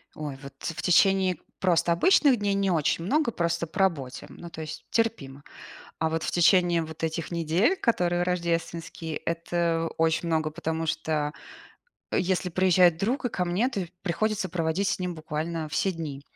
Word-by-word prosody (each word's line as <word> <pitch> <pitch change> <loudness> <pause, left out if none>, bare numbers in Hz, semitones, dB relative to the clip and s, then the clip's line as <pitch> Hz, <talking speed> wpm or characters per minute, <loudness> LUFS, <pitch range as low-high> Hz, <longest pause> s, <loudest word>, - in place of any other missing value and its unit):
Ой, 145 -3 -5
вот 140 0 -10
в 165 - -4
течение 190 0 +4 0.2
просто 175 -2 +2
обычных 275 - +5
дней 205 -1 0
не 195 -1 +1
очень 165 0 +1
много, 285 - +2
просто 170 -2 -1
по 160 - -6
работе. 140 -9 0
Ну, 170 - -10
то 160 - -9
есть 155 0 -7
терпимо. 145 -12 -1 0.6
А 160 - 0
вот 160 0 -1
в - - -1
течение 175 -1 +4
вот 160 0 -8
этих 160 +1 -3
недель, 170 - +2
которые 175 - +1
рождественские, 170 -2 -2
это 165 0 -1
очень 165 +1 +1
много, 155 -1 +1
потому 160 0 -3
что, 150 -1 -1 0.8
если 185 0 0
приезжает 180 -1 +4
друг 245 - -1
и 245 - +1
ко 180 -3 -1
мне, 190 +9 +1
то 200 -8 -3 0.2
приходится 200 +1 -1
проводить 170 +3 0
с - - -1
ним 180 -2 -3
буквально 155 +1 -4
все 190 +6 +1
дни 155 -5 -6
170 Hz, 165 wpm, -27 LUFS, 160-185 Hz, 0.8 s, обычных